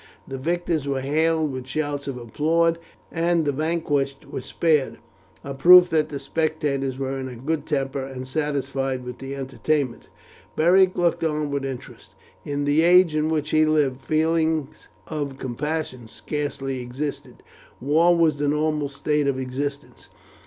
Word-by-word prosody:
The 135 -1 -6
victors 170 -1 -1
were 135 -1 -1
hailed 155 +2 +1
with 130 -1 -6
shouts 145 0 -3
of 135 -2 -4
applause, 165 +8 +1 0.3
and 165 0 +1
the 145 - +2
vanquished 145 -2 -1
were - - -6
spared, 155 -5 +1 0.5
a 140 - -5
proof 180 +5 +8
that 155 -2 +2
the 145 - -4
spectators 140 -2 -1
were 135 0 -3
in 130 - -4
a 125 - -8
good 150 +5 -3
temper 135 -2 -1
and 130 -1 -7
satisfied 135 -3 -2
with 125 -1 -8
the 135 +1 -6
entertainment. 135 -1 -2 0.5
Beric 185 +3 +4
looked 170 -1 +1
on 150 -2 -1
with 140 -1 -2
interest. 135 -2 -8 0.3
In 145 0 -2
the 145 +2 +3
age 175 -1 +5
in 155 +1 +1
which 155 -1 -1
he 155 0 +4
lived 145 -4 +1
feelings 160 0 0 0.2
of 145 -4 -4
compassion 130 -1 -4
scarcely 135 +3 -4
existed. 130 +4 -6 0.4
War 165 +6 +3
was 160 -3 +3
the 145 0 0
normal 150 0 0
state 145 +1 0
of 135 -2 0
existence. 140 +2 -5
145 Hz, 150 wpm, -23 LUFS, 135-160 Hz, 0.5 s, proof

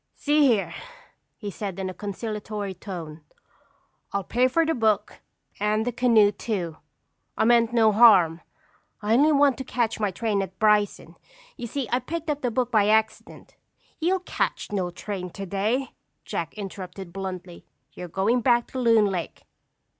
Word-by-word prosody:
"See 295 0 +3
here," 220 -6 +1 0.6
he 205 -3 -6
said 195 -2 -5
in 190 -1 -3
a 185 - -5
conciliatory 210 0 -5
tone. 170 -5 -8 0.9
"I'll 200 0 -1
pay 245 +6 +2
for 330 +6 +2
the 325 - +1
book 215 -4 0 0.4
and 210 +2 +1
the 245 - 0
canoe 230 -4 +4
too. 190 -6 -4 0.6
I - - +2
meant 235 0 +4
no 225 -2 +4
harm. 190 -7 +6 0.6
I 210 +2 +1
only 290 +6 +5
want 280 -2 +3
to - - -3
catch 235 -3 -1
my 210 -2 +1
train 205 +1 -1
at 190 -1 -6
Bryson. 210 0 +1 0.4
You 240 - -6
see, 265 +1 -3
I 245 - +2
picked 320 +5 -4
up 295 0 -4
the 250 - 0
book 245 +1 -1
by 210 -3 +3
accident—" 220 +1 -1 0.5
"You'll 360 +3 +1
catch 365 - -3
no 190 -3 -1
train 180 +1 -6
today," 200 +8 -2 0.4
Jack - - -4
interrupted 190 -3 -8
bluntly. 185 -2 -6 0.3
"You're 180 - -7
going 200 +8 +1
back 240 -1 +3
to 260 - -4
Loon 230 -3 +4
Lake. 185 -4 -4
215 Hz, 160 wpm, -25 LUFS, 195-240 Hz, 0.9 s, harm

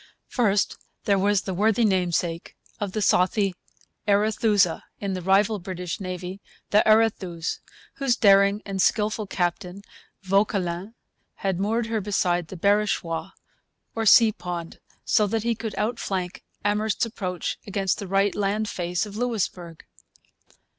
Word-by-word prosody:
First, 205 -5 +1 0.3
there 200 -1 +2
was 200 0 +2
the 190 - -3
worthy 220 +4 +2
namesake 175 -3 0 0.2
of 200 -2 -3
'the 215 - -1
saucy 195 +2 +2 0.5
Arethusa' 205 -3 +2 0.2
in 200 -1 -3
the 185 - -3
rival 195 +3 +3
British 180 -1 -5
Navy, 185 0 -6 0.3
the 210 - +6
Arethuse, 195 -6 +1 0.4
whose 270 -3 +1
daring 200 -1 +4
and 195 -1 -2
skilful 215 0 +1
captain, 180 +1 -2 0.4
Vauquelin, 195 0 0 0.5
had 190 -2 0
moored 220 +4 0
her 225 -1 -2
beside 180 -4 0
the 190 - -9
Barachois, 195 -4 0 0.6
or 225 -1 -2
sea 225 +1 +7
pond, 175 -4 -6 0.3
so 210 - +3
that 220 +1 -1
he 235 0 +1
could 220 -2 -5
outflank 195 -5 -2 0.2
Amherst's 210 +2 +1
approach 185 -6 -4
against 195 -2 -1
the 200 - -5
right 195 +1 +2
land 205 +1 -1
face 175 +2 -2
of 205 -1 -10
Louisbourg. 190 -8 -3
200 Hz, 135 wpm, -25 LUFS, 180-215 Hz, 0.6 s, sea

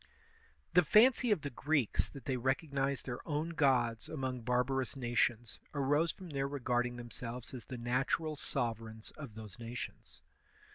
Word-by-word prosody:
The 180 - +8
fancy 235 - +6
of 205 -7 +3
the 145 - -4
Greeks 145 -2 +1
that 140 -4 -11
they 130 - 0
recognized 135 0 0
their 125 -2 -4
own 155 +1 0
gods 125 -8 +2
among 130 -4 -3
barbarous 125 +3 +1
nations 120 -2 0 0.2
arose 145 +4 +3
from 185 -4 -10
their 135 -1 0
re 140 0 -4
garding 120 -1 +1
themselves 120 0 -6
as 125 -3 -7
the 130 - -6
natural 135 +6 0
sovereigns 115 -6 -3
of 140 -8 -9
those 110 +1 -9
nations. 120 +1 -7
130 Hz, 150 wpm, -34 LUFS, 120-145 Hz, 0.2 s, The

